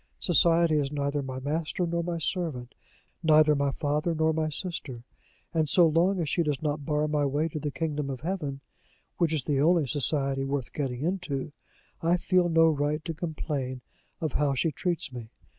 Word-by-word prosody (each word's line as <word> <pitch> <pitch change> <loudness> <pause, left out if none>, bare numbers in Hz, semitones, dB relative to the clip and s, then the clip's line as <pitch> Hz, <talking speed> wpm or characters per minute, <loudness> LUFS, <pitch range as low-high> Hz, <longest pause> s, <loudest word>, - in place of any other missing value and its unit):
Society 170 -2 +4
is 140 -1 -1
neither 145 0 -1
my 130 -1 -5
master 155 +5 -2
nor 170 0 -1
my 170 0 -2
servant, 155 -7 -3 0.5
neither 155 -2 +5
my 140 -1 +1
father 150 +3 -1
nor 160 0 +2
my 155 0 0
sister; 150 -7 -5 0.5
and 160 -3 +1
so 175 +3 +6
long 170 +4 +3
as 165 - -1
she 170 - +1
does 150 -4 0
not 150 -1 -2
bar 150 0 +1
my 150 -1 +1
way 145 +3 +1
to 155 -1 -5
the 150 - -2
kingdom 150 -1 -3
of 130 -2 -5
heaven, 155 -6 -3 0.6
which 170 -3 +2
is 155 -5 0
the 140 0 +1
only 165 0 +4
society 135 0 0
worth 135 -2 -3
getting 130 -4 -3
into, 160 -5 -2 0.5
I 170 +2 +3
feel 180 0 +2
no 165 0 +5
right 150 0 0
to 165 - -3
complain 150 -6 -4 0.4
of 155 -4 -2
how 145 -2 +1
she 160 +5 +1
treats 170 -4 -2
me. 115 -3 -7
150 Hz, 185 wpm, -28 LUFS, 140-165 Hz, 0.6 s, so